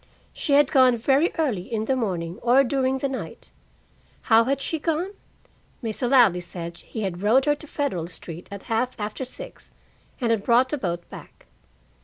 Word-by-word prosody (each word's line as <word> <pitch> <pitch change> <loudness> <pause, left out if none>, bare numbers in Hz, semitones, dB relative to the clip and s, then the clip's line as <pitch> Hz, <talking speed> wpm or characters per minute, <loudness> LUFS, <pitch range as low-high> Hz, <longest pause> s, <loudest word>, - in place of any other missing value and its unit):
She 290 - -1
had 285 -1 +5
gone 255 -3 +5
very 270 +8 +2
early 240 - -1
in 220 -1 -1
the 265 - +1
morning, 180 -8 -3
or 250 +3 +5
during 265 0 0
the 275 - -1
night. 265 -1 -7 0.7
How 225 -1 +5
had 275 +2 0
she 320 +3 -2
gone? 330 +5 -1 0.7
Mr. 230 +2 -1
Ladley 235 -10 +5
said 170 -1 -7
he 220 - -7
had 185 -2 -3
rowed 235 +6 +4
her 295 - +4
to 300 +1 -10
Federal 260 - -2
Street 170 0 -9
at 200 -1 -8
half 235 +1 -1
after 210 +5 -4
six 255 - -10 0.5
and 235 -3 +1
had 225 -3 +1
brought 245 +3 +4
the 295 - -1
boat 175 -5 -3
back. - - -12
240 Hz, 180 wpm, -24 LUFS, 200-270 Hz, 0.7 s, had